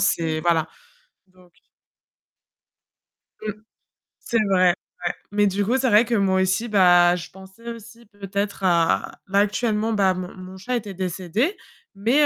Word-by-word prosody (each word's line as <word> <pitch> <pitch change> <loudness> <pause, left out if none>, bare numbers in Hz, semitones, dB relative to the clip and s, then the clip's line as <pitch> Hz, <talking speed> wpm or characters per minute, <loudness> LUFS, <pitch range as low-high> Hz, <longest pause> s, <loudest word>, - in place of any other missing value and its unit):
c'est 160 -5 0
voilà. 165 -1 +1 0.6
Donc 185 -1 -23 2.0
Mmh. 210 - -1 0.7
C'est 230 - -1
vrai. 185 -1 +5 0.4
Ouais - - 0 0.2
mais 205 0 +2
du 200 +1 0
coup, 245 +6 +1
c'est 260 -1 +1
vrai 210 +1 +6
que 235 - -1
moi 190 -2 +2
aussi, 190 +5 0
bah, 175 -4 +5
je 175 - -7
pensais 190 +4 -15
aussi 230 +1 -12
peut-être 200 -1 -4
à 170 -3 +1
là, 195 +1 +2
actuellement, 210 +1 0
bah, 195 -3 +3
mon 185 0 -6
mon 185 0 -10
chat 245 +7 -3
était 205 -3 -6
décédé 190 - -2 0.4
mais 250 +9 +3
195 Hz, 145 wpm, -23 LUFS, 185-220 Hz, 2.0 s, vrai